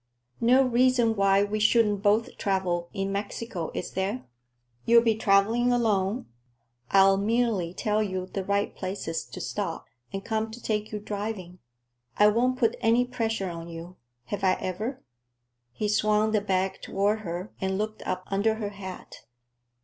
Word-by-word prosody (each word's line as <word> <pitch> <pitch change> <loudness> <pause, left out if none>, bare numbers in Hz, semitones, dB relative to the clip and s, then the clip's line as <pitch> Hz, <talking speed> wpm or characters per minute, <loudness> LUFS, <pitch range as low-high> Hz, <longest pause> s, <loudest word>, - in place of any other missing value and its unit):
No 250 +3 +5
reason 245 -2 +3
why 195 0 +4
we 210 +1 -2
shouldn't 215 -2 +3
both 210 +2 +2
travel 180 -3 0
in 195 -1 -2
Mexico, 200 -3 -4
is - - -4
there? 195 +6 -2 0.6
You'll 235 0 +6
be 230 -1 +3
traveling 220 +3 +3
alone. 220 -2 +1 0.6
I'll 195 0 +6
merely 215 -4 +1
tell 210 0 0
you 185 -3 -2
the 190 +1 -4
right 200 +1 0
places 185 -4 -4
to - - -9
stop, 190 -6 -3 0.3
and 195 0 -5
come 220 0 -1
to 225 +2 -9
take 215 -2 -2
you 210 - -3
driving. 205 -3 -5 0.6
I 210 0 +7
won't 250 +4 +1
put 230 -3 +1
any 235 +2 +3
pressure 225 -6 -2
on 165 0 -7
you. 170 +2 -9 0.3
Have 200 +8 -5
I 185 -1 +4
ever?" 215 +10 -4 0.7
He 210 - -2
swung 215 +1 +2
the 215 -1 +2
bag 190 -1 -1
toward 205 +2 0
her 180 0 -5
and 190 0 0
looked 215 +1 -3
up 185 0 -3
under 205 +3 +1
her 215 -2 -3
hat. 195 -2 -9
205 Hz, 155 wpm, -27 LUFS, 190-225 Hz, 0.7 s, I